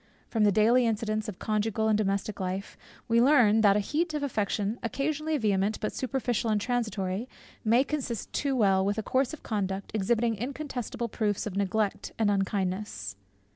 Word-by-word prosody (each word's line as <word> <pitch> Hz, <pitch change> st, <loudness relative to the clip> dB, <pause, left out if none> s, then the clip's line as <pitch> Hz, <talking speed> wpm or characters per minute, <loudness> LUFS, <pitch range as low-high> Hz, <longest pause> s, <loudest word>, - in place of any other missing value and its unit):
From 220 Hz, -2 st, +1 dB
the 205 Hz, -, +5 dB
daily 230 Hz, +5 st, +4 dB
incidents 215 Hz, -1 st, -1 dB
of 190 Hz, -, -7 dB
conjugal 220 Hz, 0 st, 0 dB
and 215 Hz, -, +3 dB
domestic 200 Hz, 0 st, -1 dB
life, 190 Hz, +1 st, -3 dB, 0.3 s
we 230 Hz, 0 st, +4 dB
learn 240 Hz, -5 st, +5 dB
that 200 Hz, -2 st, +5 dB
a -, -, +3 dB
heat 305 Hz, -, -1 dB
of 295 Hz, -, -2 dB
affection 210 Hz, -3 st, -1 dB
occasionally 305 Hz, +5 st, -1 dB
vehement, 205 Hz, -3 st, +1 dB
but 215 Hz, -, -2 dB
superficial 245 Hz, -3 st, -1 dB
and 215 Hz, -1 st, +2 dB
transitory, 215 Hz, -2 st, -2 dB, 0.3 s
may 235 Hz, +3 st, +4 dB
consist 270 Hz, -7 st, -4 dB
too 280 Hz, -2 st, 0 dB
well 195 Hz, -5 st, +3 dB
with 205 Hz, +2 st, 0 dB
a 220 Hz, -, -1 dB
course 260 Hz, +4 st, +1 dB
of 315 Hz, -, -9 dB
conduct, 195 Hz, -3 st, -3 dB
exhibiting 225 Hz, +2 st, +1 dB
incontestable 245 Hz, 0 st, -4 dB
proofs 210 Hz, -2 st, -1 dB
of 205 Hz, -3 st, -5 dB
neglect 200 Hz, +1 st, -1 dB
and 215 Hz, -2 st, +2 dB
unkindness. 190 Hz, -, -2 dB
215 Hz, 170 wpm, -28 LUFS, 200-245 Hz, 0.3 s, the